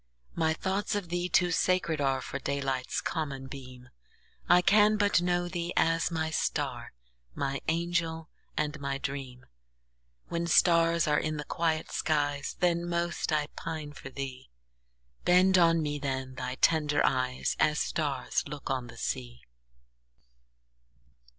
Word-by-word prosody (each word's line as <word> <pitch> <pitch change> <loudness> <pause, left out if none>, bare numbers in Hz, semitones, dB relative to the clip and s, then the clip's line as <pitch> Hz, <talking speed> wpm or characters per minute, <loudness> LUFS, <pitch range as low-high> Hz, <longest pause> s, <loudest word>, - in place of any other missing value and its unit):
My 160 -1 +1
thoughts 195 +4 -1
of 200 -4 -3
thee 175 +1 -1
too 175 +1 +3
sacred 170 -3 +1
areFor 135 -1 -1
daylight's 135 -2 -1
common 140 -5 -3
beam:I 130 - -3
can 210 +2 +5
but 205 -4 +3
know 175 0 +1
thee 175 0 -3
as 165 0 +2
my 160 -2 -2
star, - - -2 0.4
My 135 -1 -2
angel 165 -1 -1 0.3
and 150 0 -1
my 140 -1 -2
dream; 135 -3 -6 0.8
When 170 0 -2
stars 170 -1 +4
are 150 0 +3
in 155 -1 -2
the 150 - -4
quiet 160 +1 -1
skies, 145 -2 0
Then 175 -1 +1
most 170 -1 -1
I 150 -1 +2
pine 155 -3 -5
for 135 - -9
thee; 135 - -7 0.7
Bend 185 +1 +5
on 165 -1 +4
me 145 -1 -2
then 130 -2 -3
thy 125 0 -4
tender 150 -1 +3
eyes, 130 -1 0
As 150 0 +3
stars 150 -4 -1
look 145 -1 -5
on 130 -2 -2
the - - -12
sea! - - -4
155 Hz, 135 wpm, -29 LUFS, 135-170 Hz, 0.8 s, can